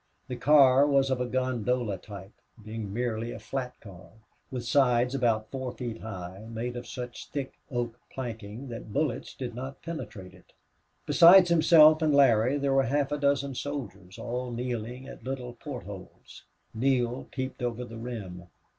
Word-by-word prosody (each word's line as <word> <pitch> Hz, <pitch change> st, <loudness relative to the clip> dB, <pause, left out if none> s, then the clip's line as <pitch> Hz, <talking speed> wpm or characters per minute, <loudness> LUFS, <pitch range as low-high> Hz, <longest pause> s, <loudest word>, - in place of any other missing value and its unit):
The 125 Hz, -, -3 dB
car 135 Hz, +1 st, +6 dB
was 135 Hz, -2 st, +3 dB
of 130 Hz, -1 st, 0 dB
a 125 Hz, -, -1 dB
gondola 125 Hz, -4 st, -1 dB
type, 100 Hz, 0 st, -10 dB, 0.3 s
being 110 Hz, -2 st, -5 dB
merely 115 Hz, 0 st, -2 dB
a -, -, -6 dB
flat 125 Hz, +3 st, -5 dB
car, 95 Hz, -3 st, -13 dB, 0.4 s
with 125 Hz, -3 st, -5 dB
sides 125 Hz, -1 st, +3 dB
about 115 Hz, -5 st, 0 dB
four 130 Hz, -2 st, -4 dB
feet 120 Hz, -3 st, -6 dB
high, 95 Hz, -1 st, -7 dB
made 120 Hz, +2 st, -4 dB
of 120 Hz, 0 st, -6 dB
such 125 Hz, 0 st, -7 dB
thick 140 Hz, -2 st, -4 dB, 0.2 s
oak 120 Hz, -2 st, -3 dB
planking 115 Hz, 0 st, -6 dB
that 115 Hz, -2 st, -8 dB
bullets 145 Hz, +1 st, -2 dB
did 125 Hz, -3 st, -5 dB
not 130 Hz, +3 st, -7 dB
penetrate 110 Hz, -, -7 dB
it. 90 Hz, -, -20 dB, 0.5 s
Besides 180 Hz, +1 st, +8 dB
himself 155 Hz, -1 st, +7 dB
and 155 Hz, -2 st, +3 dB
Larry 130 Hz, -1 st, +4 dB
there 140 Hz, -1 st, 0 dB
were 135 Hz, -, +5 dB
half 140 Hz, +3 st, 0 dB
a 145 Hz, -, 0 dB
dozen 140 Hz, -1 st, +1 dB
soldiers, 115 Hz, -10 st, -6 dB
all 125 Hz, +1 st, -4 dB
kneeling 120 Hz, +1 st, -4 dB
at -, -, -11 dB
little 125 Hz, -1 st, -5 dB
port 125 Hz, +1 st, -7 dB
holes. 95 Hz, -2 st, -11 dB, 0.3 s
Neale 125 Hz, +1 st, 0 dB
peeped 130 Hz, -1 st, -5 dB
over 120 Hz, 0 st, -2 dB
the 115 Hz, -1 st, -9 dB
rim. 100 Hz, -7 st, -7 dB
125 Hz, 165 wpm, -28 LUFS, 110-135 Hz, 0.5 s, Besides